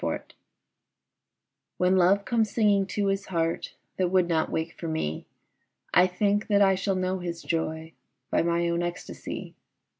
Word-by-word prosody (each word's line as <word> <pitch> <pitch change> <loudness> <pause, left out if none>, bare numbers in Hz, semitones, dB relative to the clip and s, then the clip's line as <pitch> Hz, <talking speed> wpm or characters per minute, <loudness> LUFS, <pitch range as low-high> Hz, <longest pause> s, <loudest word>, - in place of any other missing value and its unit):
Song - - -1 1.6
When 180 +1 +3
Love 190 +2 +4
comes 225 -3 +1
singing 200 -3 +2
to 205 0 -1
his 195 0 -1
heart 165 -2 -2 0.2
That 185 - +2
would 185 -1 +3
not 160 -2 +1
wake 160 +1 -2
for 170 - -4
me, 160 - -3 0.7
I 180 +1 +6
think 205 +3 0
that 205 -2 +3
I 195 -1 +5
shall 190 +1 -1
know 185 0 -1
his 170 -2 -5
joy 160 -1 -3 0.4
By - - +3
my 170 0 +1
own 170 0 0
ecstasy. 175 0 -6
180 Hz, 155 wpm, -27 LUFS, 170-195 Hz, 1.6 s, I